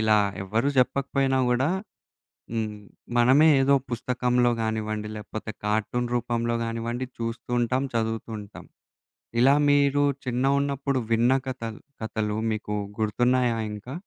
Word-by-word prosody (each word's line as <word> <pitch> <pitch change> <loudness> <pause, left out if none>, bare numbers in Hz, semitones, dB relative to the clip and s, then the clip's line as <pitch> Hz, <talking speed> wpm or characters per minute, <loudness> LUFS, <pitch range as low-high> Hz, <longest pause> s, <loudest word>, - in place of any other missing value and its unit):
ఇలా 110 -1 +4 0.2
ఎవ్వరు 110 +8 0
జెప్పకపోయినా 135 +1 +2
గూడా, 130 +6 +2 0.8
హ్మ్ 110 -2 -2 0.4
మనమే 130 +6 +6
ఏదో 140 +1 +4 0.2
పుస్తకంలో 125 +1 +1
గానివ్వండి, 110 -1 -2
లేకపోతే 110 +1 -6
కార్టూన్ 110 +3 0
రూపంలో 120 0 0
గానివ్వండి. 115 +2 -3
చూస్తూ 115 +1 -5
ఉంటాం, 125 +3 +1
చదువుతూ 115 0 -1
ఉంటాం. 105 0 -11 0.8
ఇలా 135 +3 +6
మీరు 145 0 +4 0.2
చిన్న 125 +1 0
ఉన్నప్పుడు 140 -1 -1
విన్న 115 +2 +4 0.2
కథల్ 115 -4 -5 0.2
కథలు 110 -1 -2 0.2
మీకు 105 -1 -4 0.3
గుర్తున్నాయా 120 +2 +2 0.2
ఇంకా? 105 +5 -8
120 Hz, 115 wpm, -26 LUFS, 110-130 Hz, 0.8 s, మనమే